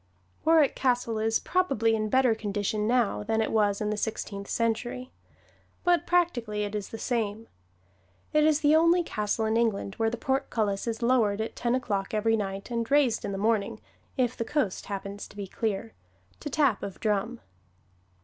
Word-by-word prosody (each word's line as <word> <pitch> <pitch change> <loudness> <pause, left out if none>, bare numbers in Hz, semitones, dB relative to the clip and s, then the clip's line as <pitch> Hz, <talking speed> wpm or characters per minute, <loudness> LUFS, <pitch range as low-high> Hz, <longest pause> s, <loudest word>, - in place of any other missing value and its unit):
Warwick 320 -3 +4
Castle 245 -4 0
is 225 +1 +2
probably 270 - +1
in 215 -1 -1
better 260 0 +4
condition 210 0 -2
now 240 -4 +2
than 220 +1 -1
it 220 - 0
was 205 -2 +2
in 210 0 0
the - - 0
Sixteenth 205 -2 -4
Century. 240 +2 -2 0.7
But 350 -3 +2
practically 240 -13 +1
it 205 0 -4
is 210 -2 -4
the 225 - -7
same. 225 -2 -2 0.9
It 305 0 +4
is 310 0 +3
the 300 0 +5
only 335 +2 +4
castle 210 -5 -1
in 220 +1 +1
England 215 -4 0
where 225 0 +2
the 240 - -4
portcullis 230 -7 -1
is 230 +1 -3
lowered 230 -4 +2
at 220 - -3
ten 240 0 0
o'clock 205 -5 -2
every 225 +1 +2
night 195 +1 -4
and 230 -1 -2
raised 280 -5 +3
in - - -3
the 195 - -3
morning 215 +1 0 0.4
(if 250 -2 +1
the - - -2
coast 270 -7 -2
happens 200 0 -5
to - - -17
be 200 - -4
clear) 220 +2 -3 0.5
to 295 - -5
tap 275 -6 +2
of 195 - -6
drum. 215 +3 -1
225 Hz, 180 wpm, -27 LUFS, 210-255 Hz, 0.9 s, the